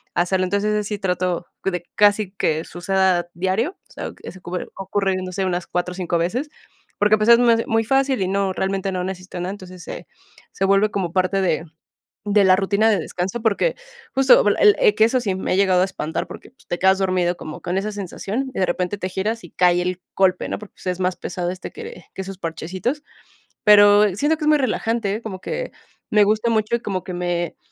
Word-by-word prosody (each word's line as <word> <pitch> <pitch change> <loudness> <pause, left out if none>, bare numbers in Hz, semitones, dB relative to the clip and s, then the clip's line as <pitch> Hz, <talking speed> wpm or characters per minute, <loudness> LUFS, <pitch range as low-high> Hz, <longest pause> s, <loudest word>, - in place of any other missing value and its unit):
hacerlo. 185 +2 +1
Entonces, 200 +3 0
ese 210 - 0
sí 210 - -3
trato 180 -2 -1 0.2
de 180 -3 -2
casi 205 -1 +3
que 160 -5 -1
suceda 180 -1 0
diario, 190 - 0 0.2
o - - -18
sea, - - -5
ese 185 - -9
ocurre 180 0 -5
ocurre, 195 0 -1
no 185 - -6
sé, 195 +1 -1
unas 180 -1 -2
4 180 0 -2
o - - -10
5, 175 -2 -1
veces, 235 - -1 0.5
porque, 210 +1 +5
ah, - - -3
pues, 215 +2 +2
es 235 0 +8 0.2
es - - -3
muy 225 0 +2
fácil 270 -2 +2
y 185 - +1
no 195 -1 0
realmente 195 0 -1
no 180 -1 -2
necesita 185 -1 -6
nada, 180 +2 -3
entonces 185 -3 -10
se - - -8 0.5
se - - -3
vuelve 195 +2 +3
como 180 -4 -2
parte 185 +1 +1
de 165 -3 0 0.6
de 205 -1 +4
la 185 0 +6
rutina 200 +3 +2
de 210 - +2
descanso, 185 +6 -3
porque 220 - +1 0.4
justo 265 -5 +6
el 205 0 +5
el 210 - +4
que 215 - +4
eso 255 +3 +2
sí 195 -5 -1
me 190 - -3
ha - - +2
llegado 190 -2 +3
a - - +3
espantar 160 -4 -4
porque, - - -11
pues, 260 - -25
te 175 - -3
quedas 190 0 +4
dormido 180 -2 +1
como 155 - -8
con 180 +2 -2
esa 205 +2 -2
sensación 205 +6 -4
y - - -2
de - - +4
repente 180 +3 -2
te 185 -2 -4
giras 215 +5 -2
y - - -12
cae 180 -1 +3
el 180 0 -3
golpe, 185 -1 +2
¿no? - - -2
Porque, 210 -1 -12
pues, - - -11
es 180 0 -1
más 180 0 0
pesado 175 -1 -3
este, 185 - -8
que 455 +2 -9
que - - -5
esos 190 -1 -7
parchecitos. 185 - -3 0.6
Pero, 205 -2 +6
siento 295 +8 +1
que 305 - -4
es - - +1
muy 305 - +5
relajante, 225 -5 -1
Como 200 -5 -6
que - - -4 0.4
me 210 -1 +5
gusta 215 +3 +1
mucho 220 +1 +1
y - - -1
como 190 -5 -3
que 185 - -6
me, 175 -1 -2
195 Hz, 225 wpm, -21 LUFS, 180-210 Hz, 0.6 s, es